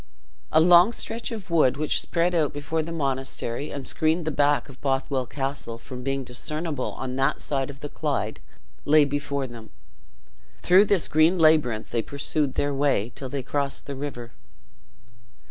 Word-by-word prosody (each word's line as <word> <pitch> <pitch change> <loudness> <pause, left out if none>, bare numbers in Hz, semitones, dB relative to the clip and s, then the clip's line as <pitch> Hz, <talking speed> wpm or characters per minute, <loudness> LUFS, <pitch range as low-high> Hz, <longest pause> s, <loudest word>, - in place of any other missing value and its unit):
A - - +5
long 175 +6 +6
stretch 230 +1 -4
of 215 -6 -7
wood, 155 -6 +3
which 155 0 +2
spread 175 +1 0 0.2
before 145 +3 -2
the 160 +2 -6
monastery, 135 -3 -3
and 140 -2 -6
screened 160 +4 0
the 160 - 0
back 145 -2 +2
of 135 -2 -14
Bothwell 135 -1 -1
Castle 135 -4 -4
from 125 +2 -9
being 135 +1 -2
discernible 150 +3 -3
on 130 0 -5
that 135 0 +1
side 135 -2 -2
of 140 -1 -10
the 145 - -4
Clyde, 135 -10 -2 0.4
lay 150 0 +5
before 140 -1 -2
them. 115 -3 -10 0.9
Through 185 +3 +6
this 200 -4 +2
green 160 +4 +4
labyrinth 155 -9 +3
they 115 - +1
pursued 140 +2 -1
their 145 0 0
way, 135 -5 +1
till 130 +1 -6
they 135 0 -4
crossed 140 +1 -2
the 140 - -5
river. 130 -4 -6
140 Hz, 165 wpm, -25 LUFS, 130-155 Hz, 0.9 s, long